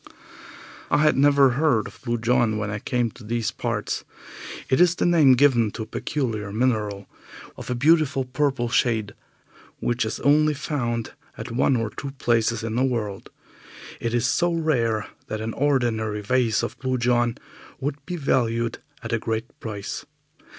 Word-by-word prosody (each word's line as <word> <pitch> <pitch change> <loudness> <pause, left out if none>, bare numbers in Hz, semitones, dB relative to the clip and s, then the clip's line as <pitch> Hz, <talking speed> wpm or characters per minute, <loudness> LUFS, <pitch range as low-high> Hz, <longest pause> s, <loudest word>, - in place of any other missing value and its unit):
I - - +3
had 150 - +4
never 140 -1 +5
heard 130 -4 +2
of 105 +3 -11
Blue 120 -2 -1
John 120 -1 +2
when 105 -1 -2
I 105 - -3
came 120 0 -1
to 125 - -14
these 110 0 -1
parts. - - -3 0.6
It 130 - +3
is 175 -1 +5
the - - 0
name 160 -6 +6
given 125 -4 +4
to 110 - -4
a - - -8
peculiar 110 -7 -3
mineral 105 -4 -1 0.5
of - - -9
a 125 - 0
beautiful 140 -1 +3
purple 135 -1 0
shade, 115 -4 +1 0.7
which 120 +1 0
is 110 - -3
only 150 +2 +4
found 120 -6 -2 0.3
at 110 +3 -6
one 130 +2 +2
or 115 -2 -1
two 140 - -6
places 115 -2 +1
in 115 -1 -3
the 125 +3 +1
world. 110 -7 -2 0.7
It 115 0 -2
is 120 - +1
so 175 0 +2
rare 120 -10 0 0.2
that 110 - -4
an 110 +1 -4
ordinary 115 -6 0
vase 120 0 +1
of - - -5
Blue 130 -1 -1
John 120 0 +1 0.4
would 145 +1 -4
be 180 - -3
valued 115 -6 0 0.2
at 115 0 -4
a 115 - +1
great 115 +1 -4
price. 105 -3 -5
120 Hz, 165 wpm, -24 LUFS, 110-135 Hz, 0.7 s, name